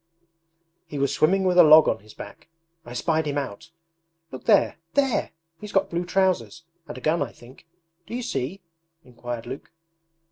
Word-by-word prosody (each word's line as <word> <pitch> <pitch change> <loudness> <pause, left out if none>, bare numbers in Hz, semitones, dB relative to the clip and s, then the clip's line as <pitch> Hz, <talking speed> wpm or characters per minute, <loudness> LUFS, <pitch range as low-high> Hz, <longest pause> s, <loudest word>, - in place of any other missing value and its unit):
'He 150 - -7
was 140 0 0
swimming 190 +5 +2
with 180 -1 +3
a - - +11
log 155 0 +8
on - - 0
his 105 +2 -17
back. - - -11 0.4
I 120 - -8
spied 160 +4 0
him 145 0 -2
out!... 140 +2 -5 0.6
Look 130 - -9
there. - - +3 0.2
There! 275 -3 +1 0.3
He's 210 -1 -9
got 195 - +1
blue 175 +1 -2
trousers, 185 -2 0 0.2
and - - -8
a - - -9
gun 155 +3 +1
I 135 -5 -2
think.... 130 +8 -17 0.4
Do - - -6
you 250 - -3
see?' 155 - -4 0.4
inquired 120 -1 -7
Luke. 130 +4 -8
155 Hz, 175 wpm, -24 LUFS, 130-185 Hz, 0.6 s, a